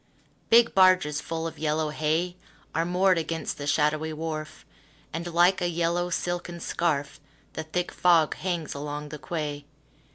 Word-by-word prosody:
Big 235 +1 +6
barges 185 -6 +4
full 165 0 -4
of 165 - -6
yellow 155 0 0
hay 160 +4 0 0.4
Are 165 - +1
moored 180 0 +3
against 165 -1 -3
the 145 - -4
shadowy 155 +1 +1
wharf, 155 -1 -5 0.5
And, 170 +2 -4
like 175 +3 +4
a 175 - +1
yellow 170 +1 0
silken 175 0 -3
scarf, 150 -5 -1 0.3
The - - -4
thick 175 +3 -2
fog 170 -4 +4
hangs 175 -4 -3
along 150 +1 -5
the 150 - -7
quay. 150 -3 -4
165 Hz, 150 wpm, -27 LUFS, 150-175 Hz, 0.5 s, Big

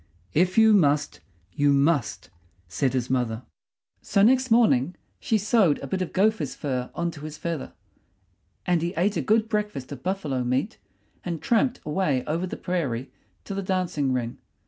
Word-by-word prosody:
"If 180 +4 +2
you 220 -1 +7
must, 145 -6 +2 0.3
you 145 0 +3
must," 140 - +1 0.4
said 125 +10 -1
his 125 -2 -1
mother. 120 -2 -1 0.6
So 200 - +2
next 260 +3 +4
morning 180 - +3 0.2
she 220 - +1
sewed 205 -6 +3
a - - -7
bit 185 +8 -2
of 185 - -3
gopher's 195 - +1
fur 130 -3 -3
on 170 0 -1
to 150 - -11
his 155 0 -7
feather; 165 -3 -4 0.9
and 175 -2 +2
he 170 +3 -2
ate 200 +4 +1
a - - 0
good 220 +1 +2
breakfast 210 - -3
of 140 - -7
buffalo 160 -9 -2
meat 130 - -1 0.4
and 170 -3 -3
tramped 240 - +1
away 150 -5 0
over 165 +4 -2
the - - -6
prairie 140 -9 -3 0.3
to 200 - -6
the 195 - -2
dancing 180 -7 -1
ring. 120 -2 -2
170 Hz, 170 wpm, -25 LUFS, 135-195 Hz, 0.9 s, you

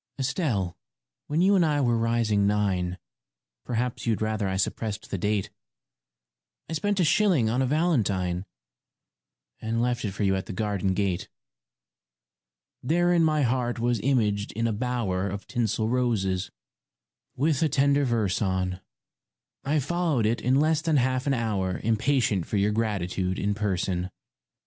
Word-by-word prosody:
] - - -52
ESTELLE, 125 - -1 0.5
when 155 +3 0
you 200 +2 +5
and 185 - +4
I 150 -2 +1
were 120 -4 +2
rising 115 -3 +1
nine 95 -4 0 0.7
Perhaps 120 0 -2
you'd 110 -2 +1
rather 110 -2 -1
I 95 0 -1
suppressed 105 +2 -2
the 100 - -1
date 105 +1 -1 1.2
I - - -5
spent 205 +5 0
a - - +4
shilling 160 - +3
on 125 +3 +1
a 130 - +1
valentine 100 - 0 1.2
And 115 +1 -1
left 120 0 0
it 105 - -1
for 100 - -3
you 95 -1 +2
at 95 - -4
the - - -5
garden 100 -2 -1
gate. 95 -3 -1 1.5
Therein 175 +4 +2
my 155 -2 +2
heart 120 -1 0
was 120 0 0
imaged 105 -6 +1
in 115 +2 -1
a 115 - +1
bower 105 -5 -1
Of 100 +2 -6
tinsel 110 -3 -1
roses, 110 -7 0 0.9
with 145 +1 +1
a 160 - +3
tender 140 +1 +3
verse 115 -7 0
on; 95 -2 -1 0.8
I 145 +3 +1
followed 155 -4 0
it 115 +2 0
in 125 +2 +2
less 155 +1 +2
than 160 -2 +2
half 130 +1 +1
an 140 - +2
hour 100 -6 -1
Impatient 115 - +1
for 105 - -1
your 100 +1 +2
gratitude 95 -4 -1
in 105 +1 0
person. 95 -3 -1
115 Hz, 155 wpm, -26 LUFS, 100-135 Hz, 1.5 s, you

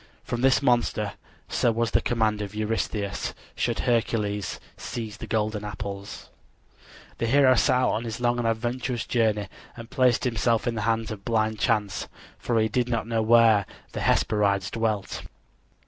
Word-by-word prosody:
From 120 - -3
this 135 +2 +4
monster, 120 -5 +1 0.3
so 120 - +2
was 115 0 0
the - - +3
command 110 -3 +1
of 105 0 -6
Eurystheus, 105 -1 -2 0.2
should - - -1
Hercules 105 -4 0 0.2
seize 110 -3 -6
the - - -7
golden 110 -1 -1
apples. 100 -1 -7 0.9
The 115 - 0
hero 135 +1 +5
set 130 +1 +3
out 125 0 +2
on 115 - -1
his 115 0 -4
long 120 0 +1
and 120 - 0
adventurous 120 +2 -2
journey 110 -4 +1 0.3
and 115 +1 -10
placed 130 -3 +3
himself 115 -2 +1
in 120 - 0
the 110 - -3
hands 115 -1 0
of 100 -2 -7
blind 110 -1 0
chance, 105 -5 0 0.3
for 115 -2 0
he 110 - +3
did 120 +3 0
not 115 -2 -1
know 115 -1 0
where 110 -3 +5 0.2
the - - -4
Hesperides 100 -3 +2
dwelt. 110 -3 -2
115 Hz, 160 wpm, -26 LUFS, 105-120 Hz, 0.9 s, hero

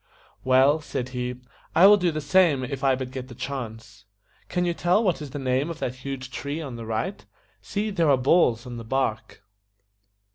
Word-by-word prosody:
"Well," 135 +4 +4
said 125 -4 -4
he, 125 0 -3 0.4
"I 175 - +7
will 205 +1 +9
do 180 -3 +1
the 155 -1 -3
same 145 -2 +3
if 135 +1 -5
I 135 -1 +4
but 130 -1 -5
get 130 -1 -6
the 120 - -11
chance. 115 -6 -7 0.4
Can 180 0 0
you 175 - 0
tell 175 +6 +2
what 180 -7 0
is 145 - -6
the 140 - -6
name 135 +2 0
of 165 - -5
that 125 -6 -3
huge 130 0 -7
tree 140 +5 -4
on 140 -6 -6
the 115 -1 -8
right? 115 - -3 0.4
See, 205 - -3
there 170 -6 +2
are 135 - +5
balls 125 -3 +3
on 120 -1 -7
the 115 - -7
bark." 110 -4 -2
135 Hz, 205 wpm, -25 LUFS, 125-160 Hz, 0.4 s, will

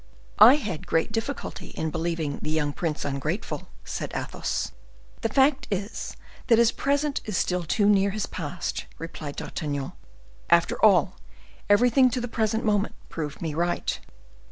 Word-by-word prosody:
"I 250 +5 +10
had 210 - -4
great 165 +5 +1
difficulty 225 +5 -4
in 160 -1 -1
believing 165 -3 -2
the - - -3
young 150 -2 0
prince 160 -2 -2
ungrateful," 140 -1 -3 0.2
said - - -4
Athos. - - -2 0.5
"The 225 - 0
fact 270 +3 +3
is, 200 +2 -4 0.3
that 230 -3 +6
his 235 0 +5
present 285 0 0
is 210 -4 -2
still 180 +1 +1
too 200 +5 +1
near 200 -1 +4
his 205 +1 -2
past," 170 0 -4
replied 155 -3 -7
D'Artagnan; 145 -3 -4 0.6
"after - - +3
all, - - +5 0.5
everything 245 +5 +5
to 250 - -2
the 245 - -3
present 225 -1 0
moment 205 -1 +1
proved 150 0 -5
me 160 -2 -2
right." 175 +3 -1
195 Hz, 150 wpm, -26 LUFS, 160-230 Hz, 0.6 s, I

